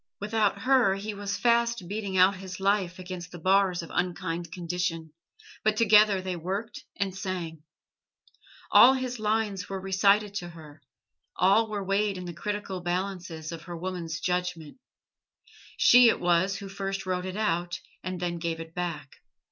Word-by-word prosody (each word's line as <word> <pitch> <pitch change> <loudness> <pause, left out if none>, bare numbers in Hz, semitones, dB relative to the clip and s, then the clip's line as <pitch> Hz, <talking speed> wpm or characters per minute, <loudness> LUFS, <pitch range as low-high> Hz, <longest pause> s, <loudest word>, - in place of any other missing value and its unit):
Without 210 0 0
her 255 -7 +4
he 205 +2 -5
was 200 0 -4
fast 235 -4 +1
beating 200 -1 -3
out 185 +2 +5
his 185 0 -8
life 195 -2 +1
against 180 -1 -7
the 175 - -8
bars 185 0 +2
of 165 - -10
unkind 175 -2 -2
condition, 170 -2 -3 0.5
but 215 0 +2
together 210 -3 +5
they 185 -1 -3
worked 195 +7 -5
and 195 -2 -2
sang. 180 -5 -5 1.1
All 255 +2 +8
his 255 -2 -4
lines 210 -3 -1
were 195 -1 -3
recited 195 +2 +2
to 175 -3 -5
her, 155 -3 -13 0.5
all 200 +5 +3
were 205 -2 -3
weighed 195 +1 0
in 180 - -6
the 175 - -6
critical 200 +1 -4
balances 175 -3 -3
of 165 -1 -7
her 175 -2 -6
woman's 170 -2 -4
judgment. 180 - -3 1.0
She 245 -1 +7
it - - +1
was 175 +2 +2
who 195 0 -7
first 195 0 -4
wrote 185 0 -2
it 185 +2 -5
out, 175 -5 -1 0.2
and 185 0 -4
then 175 -1 -3
gave 165 -1 -3
it 165 0 -9
back. 165 -6 -5
185 Hz, 160 wpm, -27 LUFS, 175-205 Hz, 1.1 s, All